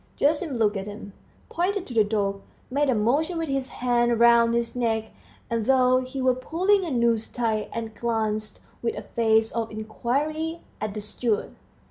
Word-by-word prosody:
Gerasim 295 -1 +1
looked 210 -2 +2
at 195 +1 -5
him, 205 -1 -8 0.3
pointed 370 +2 -1
to 250 - -8
the 220 -2 +5
dog, 200 -2 -1 0.3
made 285 +1 +1
a 255 - +3
motion 285 +11 +1
with 325 -2 -2
his 270 -1 -1
hand 240 -2 +1
round 235 0 +6
his 235 0 -1
neck, 225 -2 -1 0.4
as 230 -2 -2
though 255 -1 +4
he 255 +1 -6
were 255 0 +4
pulling 365 +10 +1
a 345 - -3
noose 235 -4 +1
tight, 220 -3 -1
and 225 -1 -5
glanced 215 -1 -2 0.2
with 235 - -1
a - - -5
face 225 -1 +2
of 230 -1 -2
inquiry 290 +10 -2 0.2
at 215 -1 -3
the 210 - -3
steward. 215 +1 -2
235 Hz, 175 wpm, -25 LUFS, 220-270 Hz, 0.4 s, round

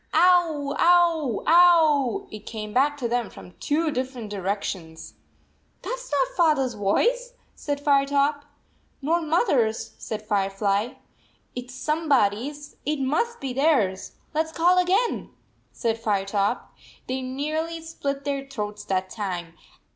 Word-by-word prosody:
" - - -38
Ovv, 325 -5 +3
ow, 335 -8 +3
ow." 335 0 +5
It 215 -1 -10
came 215 -2 -6
back 290 +3 +2
to 250 -4 -2
them 240 -1 -1
from 180 - -13
two 310 +2 0
different 255 -5 -4
directions. 190 -4 -4 0.7
"That - - -3
s - - -7
not - - 0
Father 310 -6 +3
s 255 -2 -3
voice," 480 - +1 0.2
said 285 -1 -4
Fire 280 -1 +3
top. 285 +1 +1 0.6
"Nor 335 +4 +2
Mothers," 300 - +1
said 215 -1 -5
Firefly. 200 +2 0 0.6
"It 245 0 -5
s 255 +1 -12
somebody 275 -7 +1
s. 295 0 -12
It 300 0 -1
must 315 - 0
be 265 -2 -4
theirs. 255 -10 +1 0.2
Let 315 +1 +1
s - - -11
call 355 +3 +4
again," 380 +7 +1 0.4
said 230 -1 -2
Firetop. 200 +1 0 0.4
They 260 +1 -2
nearly 305 +6 -3
split 280 -4 -4
their 275 -1 -2
throats 210 -5 -5
that 190 -1 -1
time. 180 -6 -4
275 Hz, 140 wpm, -25 LUFS, 215-320 Hz, 0.7 s, ow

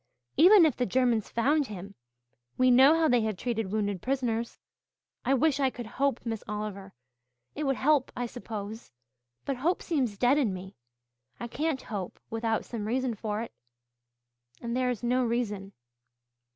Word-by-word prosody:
Even 360 +4 +8
if 300 -6 +2
the 250 - -1
Germans 240 -1 +1
found 280 +5 +2
him 200 -1 -8 0.6
we 255 0 +5
know 265 +5 +7
how 325 -1 +3
they 245 -3 +3
have 215 -3 -2
treated 225 -4 -2
wounded 205 -3 -1
prisoners. 240 -3 -1 0.7
I 270 - +3
wish 285 +1 +2
I 270 -2 +3
could 245 -2 -8
hope, 265 +3 -1
Miss 225 -2 -3
Oliver 210 -2 -5 0.6
it 300 - -3
would 270 -1 +1
help, 285 -1 +2
I 245 - -2
suppose. 225 -2 -7 0.5
But 275 - -2
hope 330 +8 0
seems 255 -11 -1
dead 255 +6 +4
in 220 -9 +1
me. 190 +1 -9 0.6
I 240 - -4
can't 295 +2 -2
hope 200 -5 -6
without 225 -1 -1
some 215 -3 -5
reason 255 +1 0
for 215 0 -3
it 235 - -10 1.1
and 235 0 -4
there 255 0 +1
is 245 -2 -3
no 250 +2 +2
reason." 215 -5 -2
240 Hz, 165 wpm, -28 LUFS, 215-265 Hz, 1.1 s, Even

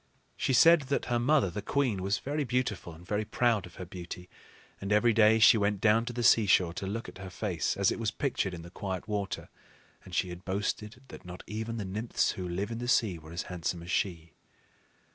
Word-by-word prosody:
She - - -1
said 165 +6 +7
that 140 - 0
her 120 - +2
mother, 130 - +3
the 105 - -4
queen, 120 -4 0
was 100 +2 0
very 145 +2 -2
beautiful 125 -9 -2
and 85 +2 -14
very 105 +3 -1
proud 110 -3 +1
of 85 - -17
her 90 - -7
beauty; 90 0 -9 0.5
and 100 +1 -4
every 110 +3 +4
day 110 0 +5
she 110 0 +7
went 100 0 +1
down 110 +2 +3
to 120 - -4
the 120 0 -3
seashore 95 -7 +4
to 95 - -5
look 115 +4 -4
at - - -11
her 95 -1 -7
face 90 -3 -2
as 100 -1 +3
it - - -3
was 115 -2 0
pictured 105 -6 -2
in 85 - -9
the 85 - -11
quiet 95 +1 -5
water; 100 -3 -3 0.6
and - - -9
she 90 - +1
had 90 +1 -8
boasted 105 +5 -3
that - - -11
not 90 0 -9
even 110 +3 -4
the 105 - -3
nymphs 105 +5 0
who 90 -3 -5
live 95 +6 -3
in 115 - -4
the 120 - -4
sea 105 -8 +2
were 80 +1 -13
as 85 +1 -3
handsome 85 -1 -4
as 85 - -7
she. 85 -4 -2
100 Hz, 225 wpm, -30 LUFS, 90-115 Hz, 0.6 s, said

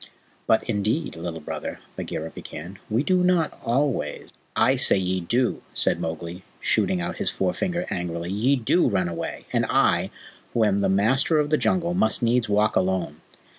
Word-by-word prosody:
"But, 110 - +3
indeed, 110 - -1
Little 80 -1 -5
Brother," - - -5 0.2
Bagheera 80 +1 -5
began, 90 +5 -9
"we 115 +5 +1
do 185 +3 +2
not 180 -3 +1
always 120 - -1
" - - -39 0.2
"I - - +2
say - - +5
ye 95 0 0
do," 120 +8 0
said - - +2
Mowgli, 85 +2 -5 0.2
shooting 185 -1 +1
out 175 +1 -3
his 205 - +1
forefinger 180 -1 -1
angrily. 85 -2 -3
"Ye 115 +8 +2
DO 130 +6 +2
run 95 -4 0
away, 85 - -5
and - - +2
I, - - +2 0.5
who 115 - +3
am 100 -2 +2
the 100 - +1
Master 120 - +2
of 150 0 +1
the - - +5
Jungle, 175 -1 +1
must 110 -9 +2
needs 120 -1 +2
walk 105 +1 +2
alone. 90 -5 0
110 Hz, 170 wpm, -24 LUFS, 90-150 Hz, 0.5 s, say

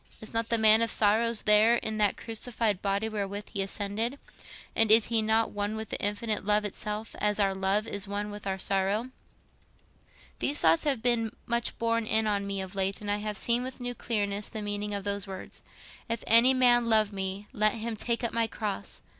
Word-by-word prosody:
Is 215 - -10
not 230 0 -1
the 230 - +2
Man 220 0 +6
of 230 - +1
Sorrows 220 +2 +2
there 215 +2 +5
in 220 -2 -3
that 205 -2 +2
crucified 225 -3 -3
body 200 +2 -1
wherewith 205 -1 -5
he 200 - -1
ascended? 205 +6 -3 0.6
And 225 -1 +4
is 225 0 +7
He 230 -1 +2
not 220 +1 +1
one 205 +1 -3
with 220 -1 -6
the - - -4
Infinite 210 +1 -2
Love 210 +1 +1
itself—as 210 0 -3
our 195 -1 +2
love 190 +2 0
is 200 0 0
one 205 +1 -4
with 205 -1 -8
our 190 0 -2
sorrow? 195 +6 0 1.3
"These 290 - +2
thoughts 165 - +3
have 270 -6 0
been 235 -3 +1
much 235 0 -1
borne 230 -1 -1
in 220 0 +2
on 200 -2 -1
me 195 -1 -2
of 190 0 -7
late, 195 0 -1
and 205 -1 -4
I 205 - +1
have 210 -1 -4
seen 235 +3 +1
with 260 +1 -7
new 245 0 -4
clearness 205 -4 -2
the 215 -2 -6
meaning 205 0 -3
of 200 - -5
those 200 0 -3
words, 190 -1 -9 0.5
'If 230 -1 -2
any 235 +4 +7
man 240 -2 +4
love 215 -2 +3
me, 195 +1 -4
let 215 -3 +2
him 230 0 -4
take 235 +3 -2
up 235 - -2
my 230 -1 +1
cross. 210 -3 -5
215 Hz, 205 wpm, -28 LUFS, 205-230 Hz, 1.3 s, is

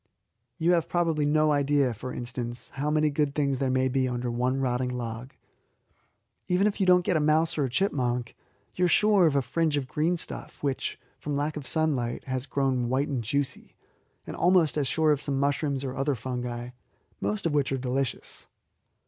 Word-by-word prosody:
You 170 0 +2
have 170 -2 +2
probably 165 -4 +1
no 155 +1 +3
idea, 140 -3 +2
for 120 +4 -7
instance, 120 -1 -5
how 145 +2 -3
many 155 0 +2
good 145 -1 0
things 140 -3 0
there 135 - 0
may 130 0 +2
be 130 0 +1
under 120 -1 -2
one 125 +3 0
rotting 125 -1 0
log. 120 0 -5 1.1
Even 180 +2 +2
if 210 - 0
you 190 - +2
do 180 - +8
not 180 - +1
get 175 - +1
a - - +2
mouse 155 +2 +2
or 145 - +1
a - - -3
chipmunk, 125 -7 -1 0.4
you 180 - +1
are - - +4
sure 200 0 +4
of 145 - +1
a 140 - +2
fringe 160 +1 0
of 135 -2 -2
greenstuff 165 +4 -2
which, 140 -2 -2 0.2
from 145 -1 -3
lack 145 +2 -1
of 145 -4 -5
sunlight, 140 -7 0
has 130 +1 -4
grown 130 -3 0
white 135 +4 0
and 130 -5 -2
juicy, 140 +5 -3 0.5
and - - -6
almost 175 -3 +3
as 145 -3 0
sure 160 +1 +2
of 145 -2 +1
some 135 -2 -1
mushrooms 140 -1 0
or 130 -1 -4
other 135 +1 0
fungi, 120 0 -4 0.5
most 105 +2 -2
of 165 - +1
which 145 -2 +1
are 135 - 0
delicious. 130 0 -3
140 Hz, 195 wpm, -27 LUFS, 125-155 Hz, 1.1 s, do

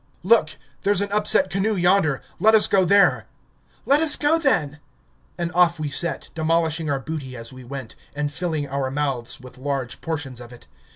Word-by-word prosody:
"Look! 180 -6 +2 0.2
there's 200 -1 +1
an 200 0 -3
upset 205 -2 +3
canoe 200 +3 0
yonder... 175 -6 +2 0.2
let 220 +1 +5
us 215 - +5
go 190 -1 +2
there." 200 +3 +3 0.6
"Let 280 +2 +4
us 320 -2 +7
go 305 +3 +2
then!" 160 - 0 0.6
And 170 0 -3
off 170 -1 +3
we 150 -1 -3
set, 170 +4 0
demolishing 160 0 0
our 140 -1 -1
booty 135 -3 -7
as 115 +2 -9
we 130 0 -12
went, 130 -1 -8 0.2
and 145 0 -2
filling 160 -4 -3
our 135 -1 -3
mouths 135 -4 -3
with 125 0 -14
large 135 -4 -4
portions 145 -6 -5
of 120 0 -12
it... 120 - -15
160 Hz, 180 wpm, -22 LUFS, 135-195 Hz, 0.6 s, us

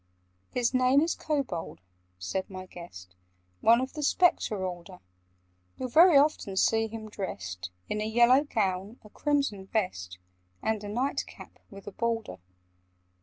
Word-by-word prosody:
"His 245 0 0
name 255 +2 +4
is 330 +2 +1
Kobold," 270 - -3 0.4
said 90 - -3
my 185 -1 -7
guest: 130 - -11 0.5
"One 230 +1 +5
of 260 +1 -3
the 305 - -5
Spectre 275 - +2
order: 180 0 -7 0.8
You'll 255 - -4
very 330 +4 +7
often 275 -9 +2
see 225 +3 +3
him 220 0 -8
dressed 95 - -6 0.2
In 210 - -2
a - - -1
yellow 240 +5 +5
gown, 205 -4 -2
a 210 - -15
crimson 275 -10 -1
vest, 90 - -2 0.5
And 220 -1 -1
a 205 - -6
night 250 +6 -1
cap - - -13
with 195 -1 -12
a 205 - -7
border. 225 - -2
215 Hz, 145 wpm, -28 LUFS, 185-255 Hz, 0.8 s, very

